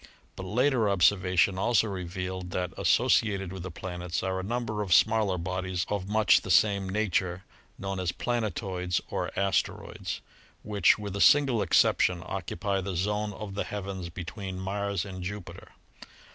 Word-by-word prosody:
But 95 - -7
later 120 +1 +2
ob 100 -3 0
servation 95 0 +3
also 115 +2 +3
revealed 90 -1 -5
that, 90 0 -3
associated 95 -4 +2
with 95 - -6
the 95 - -5
planets, 90 0 -4
are 95 0 -1
a - - -4
number 110 0 -2
of 95 -4 +3
smaller 110 -4 +3
bodies 95 +1 -2
of 100 -2 -2
much 105 -3 +4
the - - -8
same 100 +1 +3
nature 95 -3 -1 0.3
known 95 -1 -4
as 90 -2 0
"planetoids," 95 -7 -2
or - - -2
"asteroids," 100 -1 -1 0.4
which, 105 -1 +3
with 100 -2 -6
a 100 - -1
single 135 -6 +5
exception, 90 -1 +3
occupy 95 +1 -2
the 95 0 -4
zone 105 +4 -1
of 105 -1 -7
the 100 - -1
heavens 95 -3 -5
between 95 +2 -6
Mars 100 0 -2
and 95 -2 -7
Jupiter. 100 +1 -7
95 Hz, 155 wpm, -28 LUFS, 90-105 Hz, 0.4 s, single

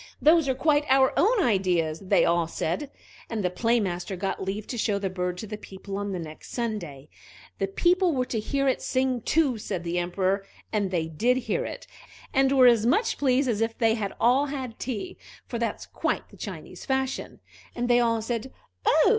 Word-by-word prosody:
"Those 315 -2 +5
are 260 - +1
quite 295 +1 +3
our 265 0 +5
own 430 0 +3
ideas," 180 - +1
they 195 - +3
all 170 -1 +2
said. 175 - -2 0.4
And 220 -3 -2
the 180 - +1
Play 235 +5 +2
master 185 -1 -3
got 195 +2 -3
leave 200 +2 -3
to 245 - -5
show 210 -2 +1
the 195 -2 -2
bird 180 -1 -2
to 220 - -5
the 210 0 -7
people 195 +1 -8
on 205 0 -3
the 185 - -2
next 155 -2 -9
Sunday. 180 - -4 0.5
The 195 - +1
people 355 - +3
were 255 -4 0
to 230 - -2
hear 275 +5 0
it 260 - +1
sing 260 -2 0
too, 280 -4 +2
said 180 -4 -4
the 175 +1 -1
Emperor; 185 +3 0 0.3
and 205 -3 +1
they 170 -3 -1
did 235 +11 +1
hear - - 0
it, - - -7 0.5
and 270 0 +4
were 265 -2 +6
as 235 -3 +6
much 435 - +2
pleased 270 -1 +3
as 225 -3 0
if 225 0 -1
they 225 -2 +3
had 210 -3 -3
all 260 +5 +4
had 260 -5 -5
tea, 265 - -4 0.3
for 235 - -4
that's 235 - -2
quite - - -2
the - - -16
Chinese - - -8
fashion; 265 -1 -2 0.4
and 240 0 -1
they 245 0 +5
all 230 -2 +1
said 235 +2 -3 0.3
"Oh!" 315 +5 +5
225 Hz, 205 wpm, -26 LUFS, 190-265 Hz, 0.5 s, were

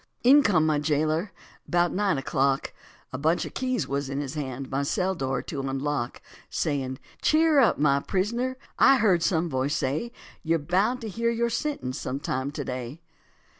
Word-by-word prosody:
In 275 +4 +7
came 180 - +3
my 155 -2 +2
jailer 155 +5 0 0.4
about 175 0 +2
nine 200 -5 +1
o'clock, 135 0 0 0.4
A 130 - -3
bunch 160 +4 +1
of - - -8
keys 255 -2 -1
was 140 0 -2
in 140 0 -2
his 145 -1 -4
hand, 135 -3 -5
my 135 +1 0
cell 180 +6 0
door 135 -6 -2
to 145 - -5
unlock, 135 -1 -3 0.3
Saying, 135 -4 -2 0.2
"Cheer 310 -1 +4
up, 245 - +4
my 140 -1 +3
prisoner, 235 - -1 0.2
I 275 - +7
heard 195 -7 +3
some 170 0 +1
voice 135 0 -1
say 155 - -1 0.3
You're 165 0 +1
bound 190 - 0
to 225 - -5
hear 230 +3 -1
your 235 0 0
sentence 225 - -3
some 135 - -3
time 130 -1 -2
to 145 -1 -5
day." 125 +3 -5
155 Hz, 175 wpm, -26 LUFS, 135-210 Hz, 0.4 s, In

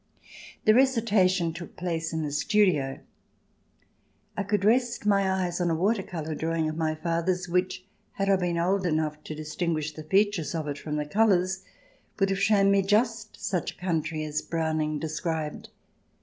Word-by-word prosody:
The 215 - +7
recitation 210 -9 +3
took 170 +1 -9
place 165 -2 -3
in 160 -1 -2
the 150 - -3
studio; 150 -4 +1 1.3
I - - -1
could 200 0 0
rest 240 0 +2
my 195 -2 +3
eyes 180 -2 -1
on 175 - +1
a 165 - +1
water 195 +5 +1
colour 160 -4 -5
drawing 160 +1 -1
of 155 - -3
my 160 -1 0
father's, 170 +3 -1
which, 180 +1 -1 0.3
had 195 - -2
I 195 - +5
been 175 -2 -1
old 185 +2 +1
enough 155 -2 -1
to 155 - -6
dis 155 0 -7
tinguish 155 -3 -1
the 155 - -8
features 190 -2 +1
of 155 -2 -3
it 145 -1 -4
from 150 -1 -4
the 150 0 -1
colours, 190 +1 +2 0.5
would 195 -1 +2
have 195 0 -1
shown 200 -2 +4
me 200 0 +4
just 215 +2 0
such 180 -3 -2
a - - -25
country 160 -3 -1
as 150 0 -2
Browning 155 -2 -1
described. 155 0 -3
175 Hz, 175 wpm, -27 LUFS, 155-195 Hz, 1.3 s, The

